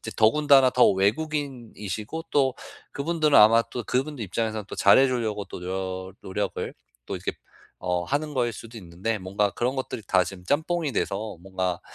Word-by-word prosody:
이제 110 - -7
더군다나 135 +3 +5
더 125 0 +5
외국인이시고 120 - -2
또 135 -3 +2 0.4
그분들은 155 0 +1
아마 115 +2 +7
또 120 - -4
그분들 135 0 -2
입장에서는 110 +1 -3
또 - - -7
잘해 130 +7 +6
주려고 110 -5 -2
또 - - -8
노려 95 0 -4
노력을 95 - -3 0.3
또 - - -3
이렇게 - - -3 0.5
어 90 -1 0
하는 145 - -2
거일 120 -2 +1
수도 115 +2 -10
있는데 95 +4 -3
뭔가 100 +2 0
그런 125 +6 -1
것들이 130 -3 -4
다 95 -1 +4
지금 95 -2 -9
짬뽕이 155 - 0
돼서 105 -2 -2
뭔가 95 -2 -2
115 Hz, 360 characters per minute, -25 LUFS, 95-135 Hz, 0.5 s, 아마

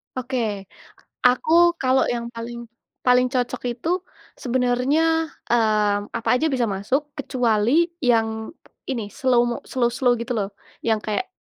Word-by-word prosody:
Oke, 235 -6 -2 0.6
aku 250 +5 +3 0.3
kalau 260 0 +3
yang 235 -1 -2
paling 235 +1 -7 0.4
paling 250 0 +5
cocok 250 -1 -2
itu, 330 +10 -2 0.4
sebenarnya, 270 +6 +1 0.2
eee, 215 -3 +2 0.2
apa 230 - -3
aja 300 +6 +2
bisa 250 -4 +1
masuk, 260 +9 -2
kecuali 250 +2 +2 0.2
yang 225 -3 +1 0.4
ini, 220 -6 -4
slow-mo 240 -2 +1
slow 240 -2 +2
slow, 245 -2 +2
gitu 235 +2 -3
loh, 200 -3 -1 0.3
yang 225 -1 +1
kayak 215 - -2
245 Hz, 125 wpm, -23 LUFS, 225-260 Hz, 0.6 s, paling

